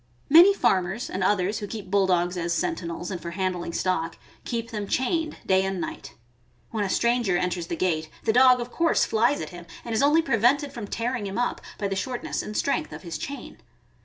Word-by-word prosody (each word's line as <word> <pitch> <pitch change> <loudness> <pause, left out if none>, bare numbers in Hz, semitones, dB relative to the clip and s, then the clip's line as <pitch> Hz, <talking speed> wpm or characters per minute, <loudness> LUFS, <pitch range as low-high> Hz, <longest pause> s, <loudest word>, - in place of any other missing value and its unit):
Many 345 +6 +9
farmers 190 - 0
and 190 - -2
others 200 +1 +1
who 205 - -5
keep 200 -3 -7
Bulldogs 185 -3 +2
as 170 -1 -1
senti 170 +1 -2
nels 170 +2 -5
and 180 - -4
for 170 - -5
handling 180 -1 -2
stock, 165 -2 -1 0.3
keep 230 -1 -3
them 210 -2 -4
chained 310 - 0
day 190 0 +3
and 190 -1 -2
night. 140 -4 -6 0.6
When 220 -2 -1
a 195 - -2
stranger 235 -4 +2
enters 175 -1 -2
the 170 - -3
gate, 160 -3 -1
the 220 - +2
dog 255 +1 +6
of 240 0 -5
course 335 -1 +2
^ - - -8
flies 235 +6 +2
at - - -5
him, 175 -1 -10 0.2
and 235 - -4
is 220 - +2
only 300 +4 +4
prevented 275 +3 +2
from 230 -5 -6
tearing 235 -1 -2
him 195 - -5
up 245 0 -1 0.2
by 200 - -1
the 195 - -2
shortness 245 +5 -3
and 210 - -5
strength 310 +3 0
of - - -9
his 170 -3 -5
chain. 280 0 -7
205 Hz, 215 wpm, -25 LUFS, 180-245 Hz, 0.6 s, Many